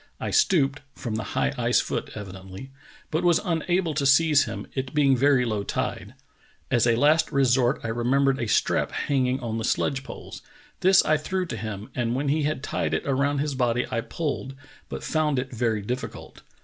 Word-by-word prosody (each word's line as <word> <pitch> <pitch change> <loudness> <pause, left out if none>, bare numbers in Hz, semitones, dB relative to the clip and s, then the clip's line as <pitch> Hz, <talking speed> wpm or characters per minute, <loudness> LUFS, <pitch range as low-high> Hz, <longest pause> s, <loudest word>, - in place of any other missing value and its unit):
I - - -3
stooped 145 - +3 0.2
[from 120 -5 -5
the 110 - -2 0.2
high - - +1
ice - - +3
foot - - -3
evidently] 95 +4 -9 0.4
but 160 +3 0
was 175 -2 +4
unable 175 0 0
to 145 -1 -1
seize 150 +1 +5
him, - - -6
it 130 +1 -4
being 140 -3 +4
very 130 0 +3
low 110 -3 -1
tide. - - -4 0.6
As 120 -2 +3
a 115 - +4
last 150 +6 +3
resort 130 -1 +2
I 115 - -3
remembered 130 +4 +1
a 120 - -2
strap 110 - +1
hanging 130 -2 0
on 115 -2 -3
the - - -3
sledge 135 +3 0
poles; - - -9 0.4
this 190 +1 +5
I 155 - +3
threw 185 +5 -2
to 150 - -5
him, 105 -2 -6
and 120 -1 -1
when 140 +2 -1
he 155 +2 +1
had 150 -2 -2
tied - - -1
it - - -3
around 140 +1 +1
his 150 -1 -2
body 125 -2 +1
I 115 - 0
pulled, 135 -2 -4 0.3
but - - -6
found 155 -3 0
it 130 +1 -3
very 110 -3 0
difficult. 125 +5 -6
135 Hz, 190 wpm, -25 LUFS, 120-150 Hz, 0.6 s, seize